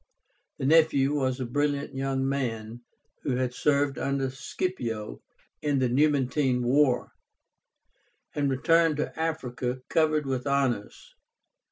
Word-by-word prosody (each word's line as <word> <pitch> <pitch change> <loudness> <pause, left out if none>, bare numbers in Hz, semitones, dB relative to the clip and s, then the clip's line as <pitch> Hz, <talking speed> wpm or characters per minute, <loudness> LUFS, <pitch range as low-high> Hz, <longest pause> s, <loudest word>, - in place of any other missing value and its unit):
The - - -3
nephew 145 -2 +4
was 130 -2 0
a 130 - -2
brilliant 145 +3 -1
young 135 0 -1
man, 120 -4 -3 0.4
who 130 - -1
had 125 -1 -1
served 140 0 +1
under 135 -1 -1
Scipio 120 - -4 0.4
in 145 -2 +1
the 130 -2 +1
Numantine 135 -1 +2
war, 130 0 +2 1.2
and 145 -1 0
returned 165 +3 +3
to 150 - -3
Africa 130 -6 -3
covered 155 -2 +2
with 130 0 -2
honors. 135 -7 -1
135 Hz, 120 wpm, -27 LUFS, 125-145 Hz, 1.2 s, nephew